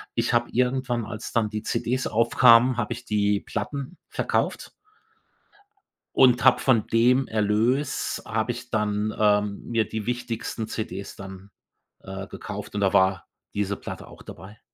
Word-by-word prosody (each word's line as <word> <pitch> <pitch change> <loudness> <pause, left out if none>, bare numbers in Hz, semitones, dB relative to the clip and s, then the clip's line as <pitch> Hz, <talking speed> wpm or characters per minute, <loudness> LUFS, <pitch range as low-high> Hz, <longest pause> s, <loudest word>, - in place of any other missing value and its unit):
ich 115 0 0
habe 120 0 +2
irgendwann, 125 -1 0
als 110 -1 -7
dann 110 -2 +1
die 105 0 -4
CDs 130 +2 -1
aufkamen, 115 +2 +5
habe 120 0 -1
ich 120 +1 -10
die 105 -2 +1
Platten 140 +9 -5
verkauft - - -2 1.4
und 125 -1 +5
hab 130 - +6
von 120 -5 +2
dem 125 +3 +3
Erlös 110 +6 0
habe 110 +2 -1
ich 120 +1 -10
dann, 105 0 -1
ähm, 105 -1 +2
mir 115 -2 0
die 110 -1 -5
wichtigsten 120 -2 -3
CDs 105 -3 -5
dann, 95 0 -10 0.5
äh, 95 0 -7
gekauft 105 +1 -8
und 105 - -1
da 100 -1 +2
war 95 0 +2 0.3
diese 100 -1 -1
Platte - - -8
auch - - -14
dabei. 105 +3 -12
110 Hz, 145 wpm, -25 LUFS, 105-120 Hz, 1.4 s, hab